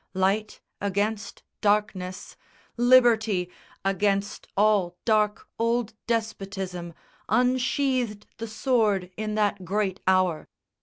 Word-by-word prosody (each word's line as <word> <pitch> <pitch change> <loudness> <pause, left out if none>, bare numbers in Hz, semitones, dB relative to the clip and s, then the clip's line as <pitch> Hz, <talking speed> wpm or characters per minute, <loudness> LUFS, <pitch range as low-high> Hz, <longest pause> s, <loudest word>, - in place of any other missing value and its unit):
Light 195 +3 0 0.2
against 205 +1 -2 0.2
darkness, 205 -3 0 0.4
Liberty 230 -7 +4 0.3
Against 200 +1 0
all 200 -4 +3
dark 215 -2 +1
old 230 -1 0
despotism, 195 -6 -3 0.3
unsheathed 250 -1 +1
The 230 - -4
sword 215 -5 +1
in 215 0 -3
that 205 -2 0
great 195 +1 -1
hour. 185 -4 +2
210 Hz, 90 wpm, -26 LUFS, 190-225 Hz, 0.4 s, Liberty